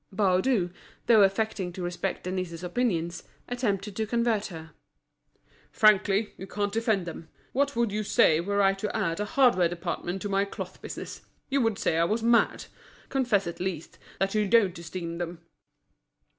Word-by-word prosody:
Baudu, 190 0 +2 0.3
though 225 -3 +6
affecting 195 -1 +1
to 180 - -6
respect 175 0 -3
Denise's 185 -2 -4
opinions, 175 -4 -1 0.3
attempted 210 -5 -2
to 220 0 -1
convert 235 -2 +1
her. 165 -3 -9 1.0
"Frankly, 205 0 +3
you 190 - -7
can't 205 0 -2
defend 220 -5 +1
them. 165 -1 -8 0.2
What 280 +1 +1
would 235 -2 +1
you 210 +1 -1
say 160 -6 +4
were 200 +3 +1
I 195 0 +5
to 195 +2 -4
add 170 -5 -1
a 210 - 0
hardware 205 -7 +3
department 175 +1 -4
to - - -2
my 195 0 +2
cloth 200 - -7
business? - - -7 0.3
You 275 0 +2
would 225 -4 +1
say 165 - +1
I 165 - +4
was 220 +5 -1
mad. 235 0 +3 0.4
Confess, 245 -7 +1
at 170 - -6
least, 180 -3 -4 0.2
that 195 0 0
you 210 -1 +1
don't 195 -5 +3
esteem 170 0 -6
them." 170 -1 -5
195 Hz, 165 wpm, -27 LUFS, 175-220 Hz, 1.0 s, though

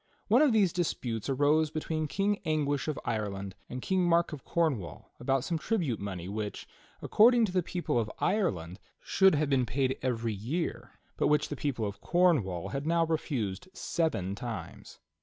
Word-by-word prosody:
One 240 +6 +6
of 300 -4 +5
these 205 -6 +3
disputes 125 - -2
arose 145 +3 +3
between 155 0 -2
King 200 +7 0
Anguish 150 -3 0
of 155 - -2
Ireland 100 -4 -3 0.2
and 125 0 -6
King 190 -1 +1
Mark 170 -1 +2
of 145 - -8
Cornwall 135 - -2
about 135 +1 +1
some 165 +1 -2
tribute 165 - -1
money 95 -3 -5
which, 105 +1 -5 0.4
according 235 +1 +5
to 195 - -4
the 185 0 +2
people 170 -6 -1
of 110 -2 -1
Ireland, 95 - 0 0.2
should 190 -3 +4
have 145 -1 0
been 130 -3 +2
paid 130 +3 0
every 115 -3 -1
year, 130 - -3 0.2
but - - +2
which 150 0 +2
the 145 - -3
people 130 -5 -2
of 100 0 -6
Cornwall 145 - +2
had 140 +2 -4
now 165 0 +3
refused 135 - -2
seven 125 - -1
times. 105 -6 -7
145 Hz, 170 wpm, -30 LUFS, 110-170 Hz, 0.4 s, One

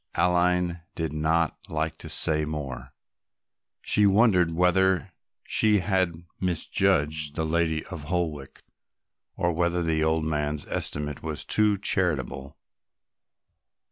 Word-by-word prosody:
Aline 90 0 +1
did 80 -2 -3
not 80 +1 0
like 80 0 -2
to - - -8
say 75 -1 +4
more; 75 -4 -6 0.9
she 105 -1 +3
wondered 95 -5 +3
whether 95 +1 +2 0.3
she 110 -1 +2
had 90 -3 -1
misjudged 75 -4 0
the 80 - -1
lady 80 -1 0
of 80 -6 -8
Holwick, 80 -5 -4 0.7
or 85 -1 0
whether 85 +1 0
the 80 -1 0
old 80 0 0
man's 75 -1 -2
estimate 75 -1 -2
was 80 -2 -4
too 105 -1 +3
charitable. 75 -9 0
80 Hz, 110 wpm, -26 LUFS, 75-90 Hz, 0.9 s, say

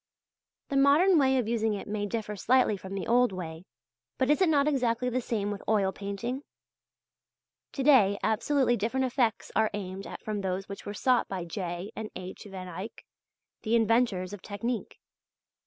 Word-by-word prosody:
The 275 - 0
modern 305 +6 +5
way 265 -1 +3
of 245 -4 0
using 225 -2 +1
it 200 - -7
may 205 0 -2
differ 210 -1 -3
slightly 245 +2 +3
from 195 0 -7
the 195 - -3
old 245 0 +3
way; 170 -2 -7 0.5
but 260 +2 +2
is 300 - +2
it 370 - +5
not 290 -2 +3
exactly 250 -4 +1
the 255 +1 -1
same 210 -3 -2
with 200 - -5
oil 200 -3 +3
painting? 205 +7 -4 1.3
To 275 - -2
day 225 -9 +5
absolutely 250 +3 +2
different 235 +5 0
effects 245 -4 0
are 220 -1 +3
aimed 195 -1 -6
at - - -9
from 210 -2 -3
those 190 0 -2
which 200 0 -8
were 205 - -4
sought 250 +2 +2
by 185 -3 -4
J. 175 +1 -5
and 220 -1 -5
H. 185 +3 -8
van 185 -1 -7
Eyck, 185 +6 -8 0.6
the 225 +1 +1
inventors 225 -5 +2
of 205 - -8
technique. 230 +3 -4
220 Hz, 175 wpm, -29 LUFS, 195-250 Hz, 1.3 s, modern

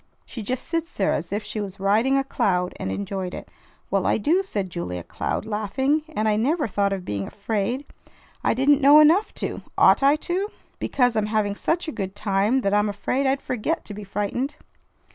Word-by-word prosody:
She 230 - -7
just 250 +5 -3
sits 330 0 -3
there 195 - +2
as 165 +4 -3
if 205 +2 -2
she 215 - -4
was 195 -1 -6
riding 220 +8 +3
a 275 - +2
cloud 180 -8 0
and 95 - -3
enjoyed 180 - -4
it." - - -9 0.4
"Well, 195 -1 +1
I - - +3
do," 320 - +2
said 200 - -3
Julia 90 - -4
Cloud, - - -3
laughing; 225 +8 0
"and 215 +1 +1
I 210 -1 +2
never 290 +6 +1
thought 200 -1 0
of 190 -2 -3
being 100 -1 -3
afraid. 220 +6 -2 0.6
I - - +2
didn't 280 +3 +4
know 285 +2 +8
enough 330 +8 +5
to. - - -4 0.2
Ought - - +6
I 280 +2 +5
to? 360 +5 -2 0.3
Because 245 -3 +1
I'm 215 -1 +1
having 210 -2 0
such 330 +11 -1
a - - -2
good 195 -6 -5
time 205 +5 +1
that 200 -3 0
I'm 210 0 +3
afraid 255 +7 -1
I'd 270 +1 0
forget 255 +7 -2
to 210 - -7
be 210 +1 -7
frightened." 210 +8 -2
215 Hz, 200 wpm, -24 LUFS, 195-275 Hz, 0.6 s, know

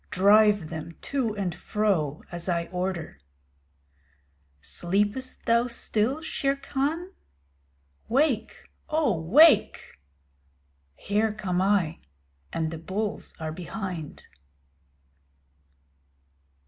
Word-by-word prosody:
Drive 205 -2 +4
them 160 +1 -7
to 250 -6 -1
and 190 -4 -1
fro 175 -7 -1
as 175 +1 -5
I 170 -1 0
order. 180 - -3 1.4
Sleepest 205 - -2
thou 235 +1 +3
still, 235 +4 -1
Shere 275 -3 0
Khan? 290 +6 -2 1.0
Wake, 250 -4 0 0.2
O 305 - +2
wake! 285 - +4 1.0
Here 210 - 0
come 185 -4 -2
I, 190 -5 +1 0.5
and 160 -1 -2
the 165 - -6
bulls 200 +5 -4
are 160 -1 -3
behind. 180 -2 -6
205 Hz, 85 wpm, -26 LUFS, 175-245 Hz, 1.4 s, Drive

